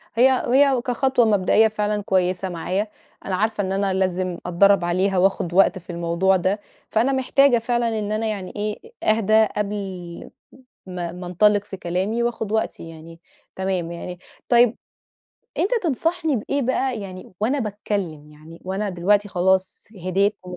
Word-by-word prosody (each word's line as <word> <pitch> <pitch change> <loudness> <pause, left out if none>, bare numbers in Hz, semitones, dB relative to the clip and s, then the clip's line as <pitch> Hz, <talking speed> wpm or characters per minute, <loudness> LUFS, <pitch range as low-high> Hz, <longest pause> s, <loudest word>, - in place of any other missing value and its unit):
هي 250 +3 +6 0.2
هي 270 0 +4
كخطوة 250 0 +1
مبدئية 210 +1 +4
فعلًا 210 -1 -1
كويسة 185 0 0
معايا، 185 +5 -2 0.4
أنا 190 - -1
عارفة 215 +1 0
إن 190 - -3
أنا 195 0 0
لازم 185 -1 -1
أتدرّب 180 +1 +4
عليها 185 +2 +1
وآخُد 180 -2 +1
وقت 190 +1 +4
في 180 - -22
الموضوع 170 +2 +1
ده، 190 +3 0 0.3
فأنا 235 +5 +2
محتاجة 265 0 +3
فعلًا 230 -1 0
إن 210 0 -3
أنا 220 +1 -1
يعني 200 -4 -4
إيه 210 - -4 0.2
أهدى 220 0 +4
قبل 195 -4 -5 0.6
ما 175 -2 -5
ما 180 0 -8
أنطلق 205 +3 +3
في 200 - -8
كلامي 190 +6 -2
وآخُد 230 -3 -2
وقتي 220 -6 -2
يعني 165 +1 -12 0.4
تمام 190 -3 -2
يعني، 180 +1 -7 0.3
طيب 240 -1 +4 0.8
أنت 400 - +1
تنصحني 320 0 0
بإيه 275 +6 -2
بقى 260 -1 0
يعني 185 -2 -9
وأنا 255 +7 +1
باتكلم، 200 - -4
يعني 155 +2 -14
وأنا 195 +2 -2
دلوقتي 200 +3 +2
خلاص 190 0 0 0.2
هديت 200 +3 +1
و 180 0 -8
200 Hz, 150 wpm, -22 LUFS, 180-220 Hz, 0.8 s, هي